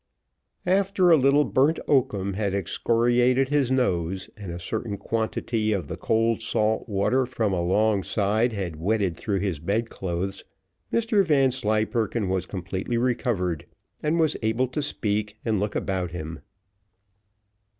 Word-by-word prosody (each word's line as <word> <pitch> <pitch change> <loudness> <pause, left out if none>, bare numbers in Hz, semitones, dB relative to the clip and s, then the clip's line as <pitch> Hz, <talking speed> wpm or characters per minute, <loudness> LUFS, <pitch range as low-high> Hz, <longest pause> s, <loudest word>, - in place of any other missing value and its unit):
After 190 -1 +3
a - - +9
little 140 +1 +4
burnt 145 +5 +2
oakum 100 -8 +1
had 100 -1 -1
excoriated 120 +7 +2
his 140 -3 +1
nose, 95 -7 0
and 100 -5 -7
a 85 - -5
certain 105 +4 -3
quantity 110 +1 -1
of 95 -4 -2
the - - -3
cold 115 0 +1
salt 110 0 0
water 125 +6 +1
from 110 -5 -1
alongside 105 +4 +1
had 95 -7 -4
wetted 95 +1 0
through 100 +2 -2
his 95 -7 -2
bedclothes, 95 -1 -2 0.5
Mr 225 -3 +2
Vanslyperken 115 - +1
was 95 -1 -1
completely 95 +5 -3
recovered, 115 - -1 0.3
and 155 +3 +1
was 155 -2 +2
able 115 +4 +1
to 150 - -2
speak 105 -6 -2
and 110 -3 +1
look 105 +1 -2
about 95 -2 -1
him. 80 -2 -6
110 Hz, 130 wpm, -25 LUFS, 95-125 Hz, 0.5 s, a